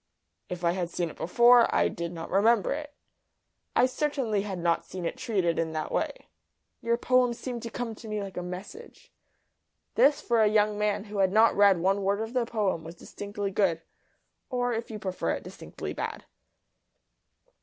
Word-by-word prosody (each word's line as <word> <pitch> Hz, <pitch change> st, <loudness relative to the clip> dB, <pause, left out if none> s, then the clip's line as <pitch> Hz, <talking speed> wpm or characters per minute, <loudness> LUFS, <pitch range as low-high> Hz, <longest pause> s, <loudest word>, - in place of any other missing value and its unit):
"If 180 Hz, 0 st, -6 dB
I 170 Hz, -, +3 dB
had 175 Hz, -1 st, -2 dB
seen 170 Hz, -1 st, -2 dB
it -, -, -14 dB
before 240 Hz, +5 st, +5 dB
I -, -, +3 dB
did 170 Hz, 0 st, -4 dB
not 165 Hz, -1 st, -7 dB
remember 210 Hz, +4 st, +3 dB
it. 295 Hz, 0 st, -6 dB, 0.8 s
I 245 Hz, -, +5 dB
certainly 255 Hz, -6 st, -1 dB
had 195 Hz, -2 st, -4 dB
not 170 Hz, -1 st, +1 dB
seen 185 Hz, -2 st, -7 dB
it -, -, -2 dB
treated 195 Hz, -9 st, 0 dB
in 160 Hz, -1 st, -1 dB
that 155 Hz, -1 st, -3 dB
way. -, -, -2 dB, 0.6 s
Your 235 Hz, -1 st, +1 dB
poem 250 Hz, -1 st, +2 dB
seemed 245 Hz, -1 st, -5 dB
to 230 Hz, -, -5 dB
come 235 Hz, -1 st, -4 dB
to 220 Hz, +1 st, -11 dB
me 215 Hz, -1 st, -2 dB
like 195 Hz, -3 st, -6 dB
a -, -, -3 dB
message." 185 Hz, -, -9 dB, 0.8 s
This 290 Hz, +1 st, +4 dB
for 235 Hz, -2 st, +1 dB
a 215 Hz, -, +5 dB
young 210 Hz, 0 st, +3 dB
man 210 Hz, -1 st, 0 dB
who 210 Hz, -1 st, -6 dB
had 190 Hz, -1 st, +3 dB
not 220 Hz, +3 st, +5 dB
read 200 Hz, -2 st, +6 dB
one 195 Hz, +3 st, +2 dB
word 200 Hz, +1 st, +1 dB
of 225 Hz, +2 st, -4 dB
the 245 Hz, -2 st, 0 dB
poem 205 Hz, -8 st, -1 dB
was 165 Hz, +2 st, -9 dB
distinctly 205 Hz, +2 st, -5 dB
good 175 Hz, -5 st, +1 dB, 0.7 s
or, 245 Hz, -1 st, 0 dB
if 230 Hz, +1 st, -4 dB
you 220 Hz, -, -5 dB
prefer 185 Hz, -3 st, -2 dB
it, -, -, -5 dB
distinctly -, -, -7 dB
bad. -, -, -5 dB
210 Hz, 185 wpm, -28 LUFS, 185-235 Hz, 0.8 s, read